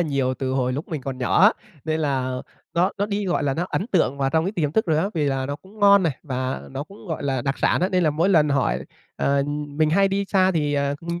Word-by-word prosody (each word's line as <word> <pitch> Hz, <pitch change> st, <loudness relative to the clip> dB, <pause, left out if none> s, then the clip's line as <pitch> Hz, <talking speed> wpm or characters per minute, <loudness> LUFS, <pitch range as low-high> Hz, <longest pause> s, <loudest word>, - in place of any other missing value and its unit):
nhiều 140 Hz, -5 st, 0 dB
từ 130 Hz, 0 st, -3 dB
hồi 130 Hz, -1 st, 0 dB
lúc 145 Hz, +5 st, -5 dB
mình 155 Hz, -3 st, -3 dB
còn 130 Hz, -1 st, -5 dB
nhỏ 125 Hz, +7 st, +2 dB
á, 210 Hz, +3 st, +8 dB, 0.3 s
nên 160 Hz, 0 st, -1 dB
là 130 Hz, -4 st, -1 dB, 0.4 s
nó 180 Hz, +3 st, +3 dB
nó 205 Hz, -, +1 dB
đi 205 Hz, -1 st, -2 dB
gọi 180 Hz, -, 0 dB
là, 140 Hz, -2 st, 0 dB
nó 175 Hz, +4 st, -2 dB
ấn 195 Hz, -, -2 dB
tượng 150 Hz, -, +1 dB
vào 135 Hz, -1 st, +1 dB
trong 160 Hz, +2 st, +2 dB
cái 195 Hz, -, -2 dB
tiềm 155 Hz, -7 st, -1 dB
thức 220 Hz, -, +1 dB
rồi 155 Hz, -2 st, +2 dB
á, 195 Hz, +5 st, +1 dB
vì 155 Hz, -3 st, 0 dB
là 135 Hz, -1 st, -1 dB
nó 145 Hz, 0 st, -3 dB
cũng 195 Hz, +6 st, -18 dB
ngon 200 Hz, -1 st, +6 dB
này 160 Hz, -7 st, 0 dB
và 130 Hz, -2 st, -3 dB
nó 135 Hz, +2 st, -5 dB
cũng, 200 Hz, +4 st, -15 dB
gọi 160 Hz, -, -3 dB
là, 135 Hz, -3 st, -1 dB
đặc 135 Hz, +2 st, -2 dB
sản -, -, +2 dB
á 185 Hz, -, +2 dB
nên 185 Hz, -2 st, +1 dB
là 155 Hz, -, +3 dB
mỗi 165 Hz, +5 st, +1 dB
lần 155 Hz, -6 st, +4 dB
hỏi, 135 Hz, -, +1 dB, 0.4 s
ờ, 140 Hz, 0 st, +1 dB, 0.3 s
mình 155 Hz, +2 st, +1 dB
hay 195 Hz, +4 st, +4 dB
đi 200 Hz, +1 st, -1 dB
xa 190 Hz, -1 st, +3 dB
thì, 150 Hz, -2 st, 0 dB
ờ, 140 Hz, 0 st, 0 dB
mình 170 Hz, +1 st, -4 dB
155 Hz, 280 wpm, -23 LUFS, 135-185 Hz, 0.4 s, á